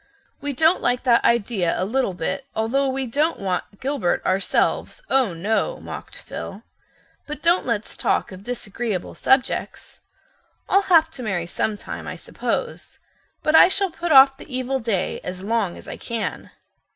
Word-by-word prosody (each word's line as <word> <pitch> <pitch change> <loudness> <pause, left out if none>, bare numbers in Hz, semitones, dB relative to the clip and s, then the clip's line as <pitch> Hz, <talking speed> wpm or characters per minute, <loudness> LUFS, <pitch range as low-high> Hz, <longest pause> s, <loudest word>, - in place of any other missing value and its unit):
"We 285 +1 -2
don't 320 +6 +3
like 245 0 +1
that 240 -3 +4
idea 205 -6 +2
a 185 - +1
little 230 -3 0
bit, 220 +11 -3
although 245 +6 +1
we 265 0 -2
don't 295 +7 0
want 195 +1 -3
Gilbert 270 -9 -1
ourselves, 195 - 0
oh, 255 -10 +3
no," 220 - -1
mocked - - -8
Phil. - - -8 0.6
"But 300 0 -5
don't 340 -1 +3
let's 230 -3 -2
talk - - 0
of 185 +1 -10
disagreeable 220 -4 -4
subjects. 265 -1 0 0.7
I'll 390 - +4
have 320 -2 +5
to 280 - -4
marry 190 -7 -2
sometime, 205 +4 -3
I - - -5
suppose, - - -4 0.5
but 305 - +2
I - - +9
shall 385 0 +1
put 335 0 -3
off 270 -1 +8
the - - -12
evil 255 +1 -1
day 220 -6 -1
as 180 +1 -6
long 210 -4 0
as - - -13
I - - -6
can." 220 -9 -4
245 Hz, 160 wpm, -23 LUFS, 200-275 Hz, 0.7 s, I